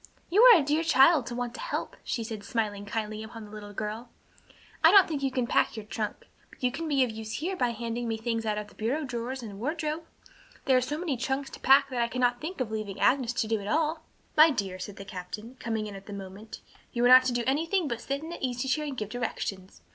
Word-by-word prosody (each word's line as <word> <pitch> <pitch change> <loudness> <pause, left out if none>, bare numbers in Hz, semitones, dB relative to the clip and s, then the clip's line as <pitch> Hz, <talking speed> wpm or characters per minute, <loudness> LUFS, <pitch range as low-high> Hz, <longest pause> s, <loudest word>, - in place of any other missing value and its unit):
"You 405 +5 +5
are 485 -4 +10
a - - 0
dear 300 +3 +2
child 300 -3 +5
to 240 - -4
want 245 -1 -3
to - - -9
help," - - -4
she 230 - -2
said, 220 -2 -6
smiling 205 -2 -2
kindly 215 0 -3
upon 220 0 -9
the 205 - -14
little 210 -1 -9
girl. 215 +3 -5 0.7
"I - - +9
don't 395 -2 +7
think 300 -4 -3
you 270 - +1
can 255 -2 -1
pack 230 - +1
your 215 - -6
trunk, 215 0 -4 0.2
but - - -18
you 250 - +3
can 325 +5 -4
be 280 -3 +3
of 245 - -1
use 220 0 -6
here 365 +5 -2
by 250 -9 +1
handing 235 +1 -3
me 225 -1 -1
things 230 0 -2
out 215 -1 -1
of 210 0 -4
the - - -19
bureau 255 +8 -1
drawers 250 0 -4
and 200 -3 -8
wardrobe. 310 +4 -2 0.6
There 265 - +4
are 255 - +4
so 275 +4 -3
many 315 -6 -2
trunks 265 +3 -2
to - - -9
pack 275 +1 +5
that 245 -2 0
I 235 - +2
cannot 245 0 0
think 335 +3 -5
of 245 -4 -2
leaving 215 -3 -4
Agnes 255 -3 +3
to 230 - -1
do 220 0 0
it 200 - -7
all." 315 +4 +1 0.3
"My 310 +1 +8
dear," 195 -9 -3
said 200 +1 -6
the 195 - -9
captain, 200 +6 -8
coming 220 -2 -2
in 210 - -7
at 195 0 -11
that 205 - -7
moment, 200 +2 -9 0.3
"you 240 0 +1
are - - +7
not 255 +1 +8
to 255 - +1
do 240 0 0
anything 325 +6 +1
but 235 -3 -3
sit 275 +4 -3
in 320 - -7
that - - -7
easy 250 0 -2
chair 300 +3 0
and 275 -3 -5
give 210 -3 -3
directions. 210 -5 -4
240 Hz, 260 wpm, -28 LUFS, 215-280 Hz, 0.7 s, are